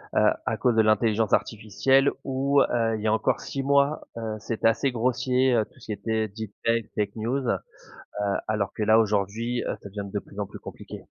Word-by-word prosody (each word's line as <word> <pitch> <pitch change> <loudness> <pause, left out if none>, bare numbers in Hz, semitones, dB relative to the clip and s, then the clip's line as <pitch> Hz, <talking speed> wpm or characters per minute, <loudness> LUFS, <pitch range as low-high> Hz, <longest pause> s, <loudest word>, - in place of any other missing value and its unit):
heu, - - +4 0.2
à - - 0
cause 120 -2 +2
de 110 - +5
l'intelligence 110 0 +2
artificielle 125 +6 +2
où, 135 +1 +2
heu, 115 -3 +1
il 110 - -5
y 110 - -1
a 110 - +3
encore 110 - +1
6 135 - -4
mois, 140 +2 +3 0.2
heu, 110 -2 -4
c'était 115 +1 0
assez 135 +4 0
grossier, 125 +2 +1
heu, 110 -2 +2
tout - - -23
ce - - -15
qui - - -4
était 110 +2 -1
deepfakes, 110 +2 -2
fake 105 -2 -1
news. 125 +5 -1 0.6
Heu, 100 -1 -2
alors 105 -2 -1
que 110 - -2
là, 110 +1 +5
aujourd'hui, 110 +3 0
heu, - - -2
ça 100 - -9
devient 100 0 -6
de 100 - 0
plus 100 - -12
en 100 - -1
plus - - -11
compliqué. - - -10
110 Hz, 210 wpm, -26 LUFS, 105-125 Hz, 0.6 s, de